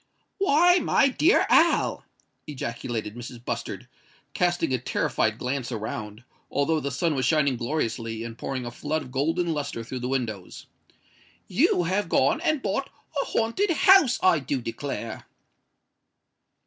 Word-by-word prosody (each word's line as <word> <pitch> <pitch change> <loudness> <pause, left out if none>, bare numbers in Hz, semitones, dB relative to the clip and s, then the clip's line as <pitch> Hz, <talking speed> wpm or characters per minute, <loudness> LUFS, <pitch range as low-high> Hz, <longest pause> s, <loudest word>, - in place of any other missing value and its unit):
"Why, 355 0 +5
my 275 - +3
dear 325 - +3
Al!" - - +3 0.4
ejaculated 115 -5 -4
Mrs. 120 0 -9
Bustard, - - -4 0.5
casting 175 -6 +1
a 130 - +1
terrified 110 -2 0
glance 130 0 -3
around, 110 0 -5 0.3
although 150 +3 +1
the 140 - -3
sun 150 +4 0
was 130 -2 -1
shining 150 -4 +2
gloriously 115 -3 -3
and 115 -1 -7
pouring 130 +1 -4
a 120 - -5
flood 155 +5 -3
of 130 - -12
golden 165 +6 0
lustre 140 -6 -4
through 125 +3 -6
the 125 - -3
windows,—"you 120 - -3
have 185 +2 -1
gone 140 - +2
and 310 -5 0
bought 210 +8 -1 0.3
a - - -3
haunted 230 - 0
house, 340 -5 +5
I 180 -4 +5
do 135 0 -2
declare!" 115 -2 -5
140 Hz, 135 wpm, -25 LUFS, 120-180 Hz, 0.5 s, Why